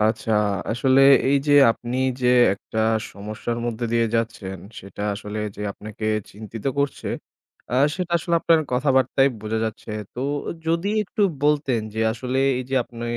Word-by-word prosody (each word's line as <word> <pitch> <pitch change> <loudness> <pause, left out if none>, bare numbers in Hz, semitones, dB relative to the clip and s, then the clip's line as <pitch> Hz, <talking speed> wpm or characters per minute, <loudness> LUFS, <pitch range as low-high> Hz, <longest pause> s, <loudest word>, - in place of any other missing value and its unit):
আচ্ছা, 110 +1 +1 0.4
আসলে 130 +3 +3 0.3
এই 140 - +4
যে 145 - +3 0.2
আপনি 120 +2 -4 0.2
যে 125 - +2 0.3
একটা 110 +2 -7 0.3
সমস্যার 110 +3 -5
মধ্য 120 0 -3
দিয়ে 115 -1 +3
যাচ্ছেন 110 -5 -2 0.2
সেটা 100 +1 -9
আসলে 105 +1 -6 0.2
যে 105 - -6
আপনাকে 110 +1 -9 0.3
চিন্তিত 110 +1 -9
করছে, 140 -1 -1 0.6
আ - - +1 0.2
সেটা 180 -2 -3
আসলে 170 +1 -1
আপনার 165 -1 +4
কথাবার্তায় 135 +1 +3
বোঝা 110 +1 -2
যাচ্ছে। 110 0 -6 0.2
তো 125 - -5 0.5
যদি 170 +4 0 0.2
একটু 210 - -2 0.2
বলতেন 145 -5 +2
যে 110 - -2
আসলে 125 +2 -3 0.2
এই - - -2
যে - - 0
আপনি 120 0 -10
120 Hz, 150 wpm, -23 LUFS, 110-135 Hz, 0.6 s, এই